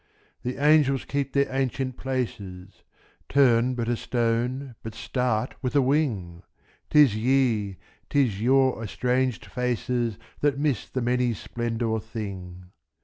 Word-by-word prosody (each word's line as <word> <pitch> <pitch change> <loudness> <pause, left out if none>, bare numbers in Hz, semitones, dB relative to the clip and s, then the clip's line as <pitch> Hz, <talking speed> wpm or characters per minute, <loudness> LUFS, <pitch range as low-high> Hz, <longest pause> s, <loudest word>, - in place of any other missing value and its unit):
The 125 +1 -4
angels 145 -2 +4
keep 140 -1 -2
their 140 0 +3
ancient 130 -1 -1
places; 105 -9 -5 0.5
Turn 125 -2 +4
but 120 -2 -2
a 120 - +1
stone, 120 +3 -1
but 110 0 -7
start 125 0 -1
a 130 +3 +2
wing! 125 - 0 0.5
âTis 145 -7 +6
ye, 110 -5 +1 0.3
âtis 125 -9 +2
your 130 -1 +3
estranged 125 +3 0
faces, 120 -2 -1 0.2
That 145 -2 +1
miss 140 -6 -1
the 130 - -2
many 125 0 +1
splendoured 115 0 -2
thing. 95 -5 -7
125 Hz, 120 wpm, -26 LUFS, 110-135 Hz, 0.5 s, âTis